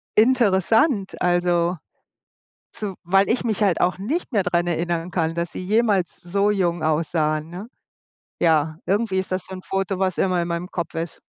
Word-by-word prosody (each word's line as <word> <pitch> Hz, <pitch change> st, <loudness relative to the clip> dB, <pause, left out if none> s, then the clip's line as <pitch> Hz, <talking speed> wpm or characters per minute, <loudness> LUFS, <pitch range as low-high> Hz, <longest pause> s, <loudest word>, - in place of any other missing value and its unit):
interessant, 220 Hz, -, +3 dB
also. 175 Hz, 0 st, +2 dB, 1.0 s
So, 205 Hz, -3 st, -4 dB
weil 195 Hz, +3 st, +3 dB
ich 240 Hz, -, 0 dB
mich 220 Hz, -2 st, -1 dB
halt 190 Hz, -5 st, +2 dB
auch 180 Hz, -, +2 dB
nicht 280 Hz, -, -3 dB
mehr 205 Hz, -4 st, +2 dB
daran 175 Hz, -1 st, 0 dB
erinnern 170 Hz, 0 st, -1 dB
kann, 165 Hz, -2 st, -1 dB
dass 170 Hz, 0 st, -3 dB
sie -, -, -6 dB
jemals 205 Hz, -3 st, +1 dB
so 200 Hz, +4 st, 0 dB
jung 175 Hz, -5 st, 0 dB
aussahen, 155 Hz, 0 st, 0 dB
ne? 190 Hz, +6 st, -8 dB, 0.7 s
Ja, 155 Hz, -2 st, +2 dB
irgendwie 200 Hz, -1 st, +1 dB
ist 190 Hz, -, -3 dB
das 185 Hz, 0 st, -2 dB
so 190 Hz, -, -8 dB
'n 185 Hz, -, -8 dB
Foto, 195 Hz, -1 st, -2 dB
was 190 Hz, -2 st, 0 dB
immer 185 Hz, -2 st, +2 dB
in 170 Hz, -, -3 dB
meinem 170 Hz, +2 st, -3 dB
Kopf 170 Hz, -2 st, -4 dB
ist. 165 Hz, 0 st, -5 dB
185 Hz, 175 wpm, -22 LUFS, 170-200 Hz, 1.0 s, interessant